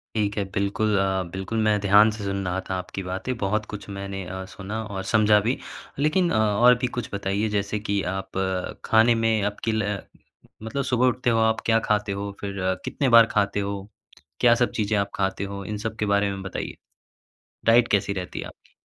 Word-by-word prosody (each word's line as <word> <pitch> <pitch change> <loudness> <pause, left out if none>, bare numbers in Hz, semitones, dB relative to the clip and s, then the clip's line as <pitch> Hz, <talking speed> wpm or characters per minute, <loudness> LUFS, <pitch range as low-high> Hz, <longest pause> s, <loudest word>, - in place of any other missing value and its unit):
ठीक 105 -1 0
है। 100 - +1
बिल्कुल, 100 +1 +1
अ, 95 -1 +1
बिल्कुल, 95 +4 -3
मैं 105 -1 +3
ध्यान 105 +2 +6
से 105 -1 -6
सुन 100 -1 -2
रहा 90 +1 -1
था 95 - -1
आपकी 90 +1 -5
बातें। 95 +7 -3
बहुत 105 +1 -1
कुछ 105 0 -7
मैंने 100 -1 -5
अ, 95 +1 -6
सुना 105 +4 -6
और 100 -3 -5
समझा 105 -1 +5
भी। 115 +6 0 0.4
लेकिन 170 +4 +2
अ, - - +1
और 110 +3 +5
भी 125 - 0
कुछ 120 -3 -3
बताइए। 100 +2 -1
जैसे 105 0 -1
कि 100 -2 -1
आप 95 0 -5 0.5
खाने 115 +2 +5
में, 115 -2 +1
आपकी, 105 +2 -2
ल 105 -2 -1 0.6
मतलब 110 +5 -2
सुबह 125 -1 +2
उठते 125 0 +1
हो 115 - +2
आप, 110 0 +2
क्या 115 -1 +4
खाते 105 -1 +1
हो? 100 +1 -4
फिर 100 -1 -5 0.3
कितनी 140 - -1
बार 115 - +9
खाते 100 0 +2
हो? 100 0 -4 0.5
क्या-सब 120 0 +4
चीज़ें 105 +1 +1
आप 100 0 -1
खाते 95 0 -1
हो? 100 0 -6
इन 105 +2 -4
सब 110 - -4
के 105 - 0
बारे 100 0 +2
में 95 -1 -5
बताइए। 95 - -5 0.9
डाइट 115 +1 +5
कैसी 100 0 +1
रहती 90 -2 -5
है - - -5
आपकी? - - -18
105 Hz, 200 wpm, -24 LUFS, 100-110 Hz, 0.9 s, बार